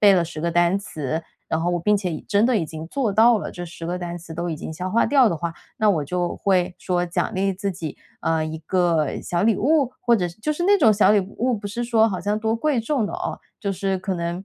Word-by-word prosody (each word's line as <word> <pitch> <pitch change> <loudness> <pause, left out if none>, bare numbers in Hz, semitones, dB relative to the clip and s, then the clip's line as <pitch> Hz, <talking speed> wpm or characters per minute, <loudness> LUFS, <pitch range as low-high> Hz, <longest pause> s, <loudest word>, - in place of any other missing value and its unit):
背 205 -2 +7
了 175 -2 +3
10 160 -2 -7
个 170 +2 0
单 175 +2 +3
词， 160 -5 -4 0.3
然 160 - 0
后 175 - 0
我 175 - 0
并 210 +4 +3
且 185 -4 -2
已 155 - -4
真 205 +1 +3
的 245 -1 +3
已 175 - 0
经 160 0 -7
做 235 -1 -1
到 225 +2 +5
了， - - -5
这 175 - -6
10 165 -1 -8
个 175 - -2
单 175 -1 -5
词 165 -1 -10
都 170 +1 -3
已 160 - -3
经 160 - -6
消 180 +3 -4
化 230 - +3
掉 270 -4 +5
的 170 - -1
话， 170 +1 -4 0.2
那 215 -2 +3
我 155 -7 0
就 175 +3 -2
会 180 -2 +1
说 180 -1 0
奖 170 - -1
励 195 +1 +1
自 195 +2 -3
己， 165 -4 -6 0.2
啊， 160 -1 +1
一 155 0 -5
个 165 -2 0
小 175 +1 -1
礼 220 -2 +3
物， 275 0 +2
或 240 -1 +3
者 180 - 0
是 170 - -13
就 305 +7 0
是 325 +3 -4
那 405 +2 +5
种 225 - +6
小 205 -1 +4
礼 210 - +4
物， 230 +6 -1
不 205 -1 -5
是 235 +4 -3
说 225 -2 +3
好 185 -4 -3
像 205 +1 0
多 220 +1 0
贵 260 0 +1
重 235 0 0
的 - - -6
哦， - - -4 0.2
就 200 - -1
是 195 0 -1
可 190 0 -3
能 170 +2 -3
185 Hz, 285 characters per minute, -23 LUFS, 170-220 Hz, 0.3 s, 背